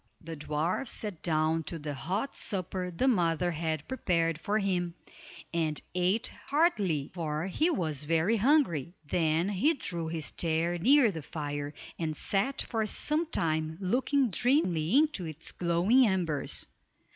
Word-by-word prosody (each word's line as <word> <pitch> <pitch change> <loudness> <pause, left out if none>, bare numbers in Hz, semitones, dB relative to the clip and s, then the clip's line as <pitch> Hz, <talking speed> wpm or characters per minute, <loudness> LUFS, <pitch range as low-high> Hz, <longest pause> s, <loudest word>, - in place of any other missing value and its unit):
The 165 0 -7
dwarf 155 - -1
sat 205 -7 -4
down 160 0 +1
to 170 - -4
the 150 -1 -5
hot 190 - -3
supper 185 -2 -3
the 180 +10 0
mother 175 -6 +2
had 160 -2 -2
prepared 165 -10 0
for 210 +1 0
him, 180 -4 -1 0.6
and 160 -3 0
ate 185 +6 +1 0.2
heartily, 205 - +1
for 160 -2 -2
he 300 - +1
was 160 - -1
very 165 +8 +2
hungry. 200 - +2
Then 160 +3 +1
he 245 - +2
drew 170 -10 -2
his 160 -2 -2
chair 170 +1 0
near 255 - +5
the 160 -4 -6
fire, 145 -1 -5 0.2
and 155 -2 -2
sat 205 +8 0
for 225 -2 -1
sometime 165 - -1
looking 255 +6 +1
dreamily 190 - +2
into 295 - +2
its 155 0 -8
glowing 180 +9 +3
embers. 170 -7 -1
175 Hz, 140 wpm, -30 LUFS, 160-220 Hz, 0.6 s, near